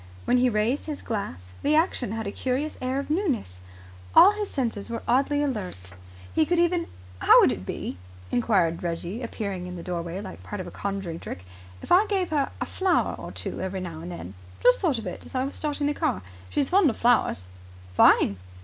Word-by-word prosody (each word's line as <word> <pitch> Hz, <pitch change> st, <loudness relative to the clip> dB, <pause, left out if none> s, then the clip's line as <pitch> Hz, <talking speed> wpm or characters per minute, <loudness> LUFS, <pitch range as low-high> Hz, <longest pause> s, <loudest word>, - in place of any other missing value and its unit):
When 250 Hz, -, +3 dB
he 250 Hz, 0 st, +4 dB
raised 225 Hz, +5 st, 0 dB
his 300 Hz, -2 st, -5 dB
glass 90 Hz, -, -4 dB
the 300 Hz, +1 st, +2 dB
action 310 Hz, -, +1 dB
had 225 Hz, 0 st, -3 dB
a 200 Hz, -, -2 dB
curious 265 Hz, +7 st, -2 dB
air 255 Hz, +1 st, -1 dB
of 280 Hz, +1 st, -3 dB
newness. 275 Hz, -, -1 dB, 0.6 s
All 395 Hz, -, +10 dB
his 420 Hz, -1 st, -3 dB
senses 230 Hz, -6 st, -2 dB
were 230 Hz, 0 st, -4 dB
oddly 280 Hz, +4 st, +2 dB
alert. 185 Hz, -, -4 dB, 0.4 s
He -, -, +4 dB
could 350 Hz, +3 st, +1 dB
even 345 Hz, 0 st, +2 dB, 0.3 s
"How -, -, +7 dB
would -, -, +5 dB
it -, -, -5 dB
be," 90 Hz, -, -4 dB, 0.3 s
enquired 185 Hz, -9 st, +2 dB
Reggie, 175 Hz, +6 st, -3 dB
appearing 200 Hz, -6 st, -4 dB
in 180 Hz, -, -6 dB
the 170 Hz, -, -7 dB
doorway 175 Hz, 0 st, -4 dB
like 205 Hz, -, -8 dB
part 205 Hz, -, -6 dB
of 185 Hz, -, -4 dB
a -, -, -8 dB
conjuring 195 Hz, -5 st, -4 dB
trick, 95 Hz, -, -7 dB, 0.4 s
"if -, -, -8 dB
I 390 Hz, +5 st, +6 dB
gave 385 Hz, -5 st, 0 dB
her 290 Hz, -3 st, +1 dB
a -, -, -1 dB
flower 375 Hz, -2 st, +1 dB
or -, -, -8 dB
two -, -, -4 dB
every 190 Hz, 0 st, -3 dB
now 170 Hz, -3 st, -6 dB
and 175 Hz, +2 st, -7 dB
then? 95 Hz, -, -7 dB, 0.3 s
Just 250 Hz, -, +6 dB
thought 310 Hz, -9 st, +1 dB
of 225 Hz, -, -6 dB
it -, -, -6 dB
as -, -, -12 dB
I 255 Hz, -, +1 dB
was 275 Hz, -, -5 dB
starting 295 Hz, -1 st, -2 dB
the 295 Hz, -, +1 dB
car. 295 Hz, -5 st, -1 dB, 0.3 s
She's 285 Hz, -2 st, 0 dB
fond 370 Hz, -4 st, +5 dB
of 230 Hz, -, -3 dB
flowers." 235 Hz, -, +2 dB, 0.5 s
"Fine!" 100 Hz, +1 st, +5 dB
235 Hz, 210 wpm, -26 LUFS, 180-295 Hz, 0.6 s, All